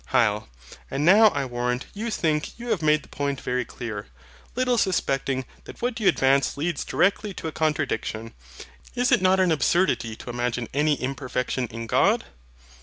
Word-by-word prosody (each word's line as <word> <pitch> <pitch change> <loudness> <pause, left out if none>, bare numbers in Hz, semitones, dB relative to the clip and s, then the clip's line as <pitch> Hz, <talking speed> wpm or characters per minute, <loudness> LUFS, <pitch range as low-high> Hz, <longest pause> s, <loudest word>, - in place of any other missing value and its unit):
HYL. 105 -3 +2 0.4
And 140 +2 -1
now 210 +5 +8
I 140 -9 0
warrant 125 0 -2
you 220 +3 -4
think 155 -8 -1
you 240 +1 -7
have 210 -7 0
made 150 -1 +3
the - - -16
point 140 -2 -3
very 125 0 -1
clear, 110 -4 -7 0.5
little 250 -1 +2
suspecting 135 -8 0 0.2
that - - -11
what 245 -1 -1
you 210 - +1
advance 135 +1 +3
leads 160 +1 -1
directly 200 0 +1
to - - -5
a - - -3
contradiction. 145 -8 -2 0.6
Is 245 0 +1
it - - +4
not 185 0 +4
an 185 -2 +3
absurdity 155 -6 +1
to 120 - -8
imagine 120 0 -2
any 150 +2 +2
imperfection 130 -1 -2
in 115 0 -7
God? 115 - +3
145 Hz, 170 wpm, -25 LUFS, 125-185 Hz, 0.6 s, now